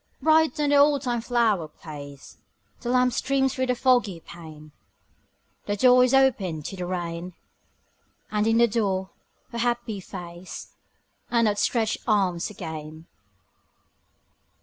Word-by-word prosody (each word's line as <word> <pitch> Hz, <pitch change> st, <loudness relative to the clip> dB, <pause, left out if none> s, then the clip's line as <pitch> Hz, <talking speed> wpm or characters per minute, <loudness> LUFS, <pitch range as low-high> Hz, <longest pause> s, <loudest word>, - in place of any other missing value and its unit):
Bright 315 Hz, 0 st, +3 dB
on 290 Hz, -1 st, +1 dB
the 290 Hz, -, +5 dB
oldtime 280 Hz, -5 st, +3 dB
flower 225 Hz, -8 st, +1 dB
place 145 Hz, -3 st, -11 dB, 0.4 s
The 240 Hz, -, -5 dB
lamp 250 Hz, 0 st, +3 dB
streams 265 Hz, +1 st, +1 dB
through 260 Hz, 0 st, -1 dB
the 250 Hz, -, +1 dB
foggy 240 Hz, -8 st, +2 dB
pane; 155 Hz, -3 st, -12 dB, 1.0 s
The 205 Hz, -, 0 dB
door 250 Hz, +3 st, +6 dB
is 250 Hz, -, +2 dB
opened 195 Hz, -, +2 dB
to -, -, -5 dB
the 180 Hz, -1 st, -5 dB
rain: 175 Hz, 0 st, -4 dB, 1.0 s
And 210 Hz, 0 st, +1 dB
in 225 Hz, 0 st, +3 dB
the 235 Hz, 0 st, +5 dB
door 195 Hz, -4 st, -1 dB, 0.4 s
her 235 Hz, -, -4 dB
happy 240 Hz, -3 st, -1 dB
face 175 Hz, -1 st, -9 dB, 0.6 s
And 230 Hz, -2 st, +3 dB
outstretched 215 Hz, +2 st, 0 dB
arms 190 Hz, -5 st, +1 dB
again. 160 Hz, -4 st, -8 dB
215 Hz, 125 wpm, -25 LUFS, 175-250 Hz, 1.0 s, door